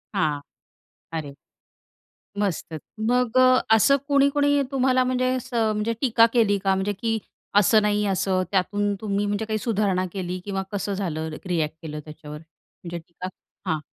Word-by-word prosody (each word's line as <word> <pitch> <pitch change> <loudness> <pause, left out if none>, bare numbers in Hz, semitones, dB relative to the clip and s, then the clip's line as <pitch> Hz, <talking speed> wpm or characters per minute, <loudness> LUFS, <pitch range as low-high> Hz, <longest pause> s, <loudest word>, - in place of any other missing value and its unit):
हां. 150 -6 +1 0.8
अरे. 150 -3 -5 1.1
मस्तच 170 -5 -2 0.3
मग 250 0 +2 0.3
असं 225 +6 +6
कोणी-कोणी 285 0 +3
तुम्हाला 255 -1 +3
म्हणजे 255 0 0
असं 235 -3 0
म्हणजे 210 +2 -1
टीका 230 -4 +5
केली 220 -4 +3
का? 195 0 +3
म्हणजे 190 +2 -1
की 225 -1 0 0.4
असं 210 +2 +5
नाही, 210 0 +1
असं. 190 -1 +1
त्यातून 205 +1 +1
तुम्ही 205 -1 -1
म्हणजे 205 +2 -1
काही 215 0 -1
सुधारणा 200 -5 0
केली? 185 -1 -4
किंवा 195 -1 -2
कसं 205 0 -2
झालं, 160 -5 -3 0.2
रिएक्ट 160 -4 -1
केलं 150 -2 -6
त्याच्यावर? 150 -1 -9
म्हणजे 170 +1 -11
टीका. 170 +2 -8 0.4
हां. 160 - 0
205 Hz, 140 wpm, -24 LUFS, 180-230 Hz, 1.1 s, असं